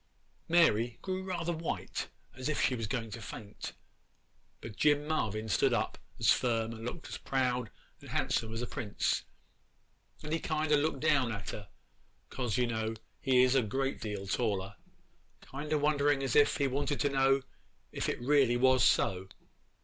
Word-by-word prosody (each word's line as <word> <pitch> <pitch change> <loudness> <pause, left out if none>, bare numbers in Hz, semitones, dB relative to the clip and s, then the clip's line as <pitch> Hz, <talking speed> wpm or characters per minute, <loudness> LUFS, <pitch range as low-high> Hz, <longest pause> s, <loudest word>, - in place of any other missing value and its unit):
Mary 120 -9 +3
grew 185 -1 -2
rather 175 -2 -2
white 165 0 -4 0.3
as 130 +3 -4
if 155 - 0
she 130 - +2
was 115 -3 -2
going 115 -1 -3
to 115 - -7
faint; 105 0 -8 0.9
but 110 -2 -9
Jim 145 +3 +3
Marvyn 110 -8 -1
stood 95 -4 +2
up - - -1 0.2
just - - +4
as - - 0
firm 115 -2 0
and 115 0 -9
looked 125 +8 -6
as - - -6
proud 125 -3 0 0.3
and - - -12
handsome 110 - 0
as 115 +2 -3
a - - -1
prince, 105 -3 -2 1.0
and 150 +1 -4
he 165 - +1
kind 155 -1 -1
o' - - +7
looked 145 -2 0
down 145 -6 +3
at 100 -3 -5
her, 100 -3 -8 0.6
'cause 125 -5 -2
you 125 - +3
know 110 -1 -2 0.2
he 130 -2 +4
is 130 0 +4
a 135 - +4
great 135 +5 -2
deal 105 -3 -4
taller, 100 -2 -1 0.7
kind 145 +3 -7
o' 155 - +3
wondering 145 -1 +2
as 130 -3 -1
if 145 -1 +5
he 140 - +1
wanted 140 +2 -1
to 145 - +2
know 135 0 +3 0.5
if - - -2
it - - -1
was 120 - -7
really 130 -2 +4
so. 95 -5 +3
130 Hz, 180 wpm, -32 LUFS, 115-145 Hz, 1.0 s, o